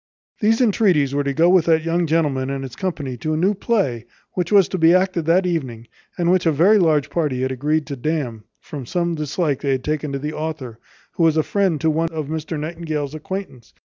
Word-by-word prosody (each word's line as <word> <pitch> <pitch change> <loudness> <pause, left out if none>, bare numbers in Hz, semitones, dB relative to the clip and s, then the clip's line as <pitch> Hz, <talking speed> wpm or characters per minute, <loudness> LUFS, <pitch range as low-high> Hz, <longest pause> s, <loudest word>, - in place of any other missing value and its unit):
These 225 +3 +2
entreaties 190 - +2
were 145 0 0
to 140 - -1
go 160 +5 +3
with 180 -2 +4
that 160 -1 +3
young 170 +1 0
gentleman 145 -5 0
and 135 0 -3
his 130 -2 -8
company 145 -9 -4
to 155 +6 -2
a - - -1
new 190 +6 +2
play, 185 - -1 0.3
which 180 0 -2
was 200 -3 +6
to 185 - -3
be 165 +2 +6
acted 185 -3 +1
that 180 +3 +3
evening, 130 -10 -3 0.3
and 175 0 +2
which 185 -2 +2
a - - +4
very 185 +9 +4
large 155 -5 +2
party 145 -7 -1
had 130 - -1
agreed 150 +4 0
to 140 0 -5
damn, 130 -5 -3 0.2
from 140 -5 -8
some 170 +2 -1
dislike 150 -1 -2
they 140 -2 +1
had 130 -1 -2
taken 150 -1 -2
to 140 - -2
the 150 +3 -4
author, 150 -8 -5 0.3
who - - -5
was 160 -1 +4
a 155 - +3
friend 190 -5 0
to 160 - +2
one 165 +2 0
of 155 -3 -5
Mr 160 0 -4
Nightingale's 155 -2 -4
acquaintance. 155 - -7
155 Hz, 225 wpm, -21 LUFS, 140-175 Hz, 0.3 s, was